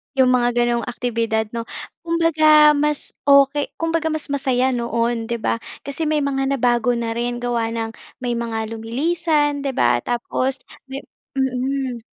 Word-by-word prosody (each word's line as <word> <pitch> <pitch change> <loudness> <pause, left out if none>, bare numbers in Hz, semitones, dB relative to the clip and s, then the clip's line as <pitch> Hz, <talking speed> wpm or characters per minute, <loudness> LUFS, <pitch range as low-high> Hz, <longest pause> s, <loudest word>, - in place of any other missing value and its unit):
'Yong 260 -1 +4
mga 245 -1 +3
ganong 240 -1 +1
aktibidad 230 -2 -1
'no. 230 - -2 0.4
Kumbaga 310 -3 +5
mas 300 -1 +1 0.3
okey 280 +1 +5 0.2
kumbaga 330 -1 0
mas 310 -1 -2
masaya 260 -2 +1
noon 235 -1 -1
'di 235 - -1
ba? 220 - 0 0.3
Kasi 280 +3 -3
may 305 -1 +1
mga 275 -1 0
nabago 245 -2 +2
na 230 -1 -2
rin, 240 +1 -2
gawa 235 -2 -1
ng 225 -1 -3 0.3
may 245 -1 -2
mga 230 -1 -3 0.2
lumilisan 295 +5 0
'di 275 - -1
ba, 120 - +2
tapos 255 +2 -1 0.3
may 270 - -4 0.4
mm. 260 -2 -1
255 Hz, 150 wpm, -21 LUFS, 235-290 Hz, 0.4 s, Kumbaga